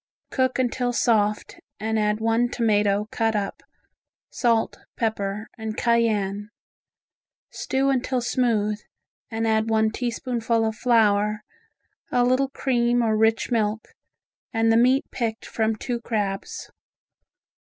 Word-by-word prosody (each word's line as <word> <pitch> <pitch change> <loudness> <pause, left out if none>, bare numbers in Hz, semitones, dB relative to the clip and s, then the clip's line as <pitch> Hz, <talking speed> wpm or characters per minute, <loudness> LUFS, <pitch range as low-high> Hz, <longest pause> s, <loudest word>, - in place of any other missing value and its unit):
Cook 260 -1 +1
until 245 -1 0
soft 215 -3 +1 0.2
and 220 +1 -1
add 210 0 +1
one 225 +2 +1
tomato 210 -3 +1
cut 225 -1 0
up, 200 -1 -3 0.7
salt, 230 -2 +1 0.2
pepper 210 -1 -2
and 220 0 -5
cayenne. 210 -4 +1 1.0
Stew 270 +1 0
until 255 -1 0
smooth, 230 -4 0 0.5
and 225 0 -2
add 220 0 +1
one 220 0 +2
teaspoonful 235 -1 -1
of 220 0 -2
flour, 210 -3 +2 0.7
a 245 - +3
little 255 +2 +2
cream 245 -3 +1
or 220 -1 +2
rich 220 +3 +2
milk, 220 -1 0 0.6
and 225 -1 +2
the - - +4
meat 255 +5 +4
picked 225 -2 -3
from 220 -1 -1
two 235 +2 -4
crabs. 205 -4 -3
225 Hz, 120 wpm, -24 LUFS, 215-240 Hz, 1.0 s, the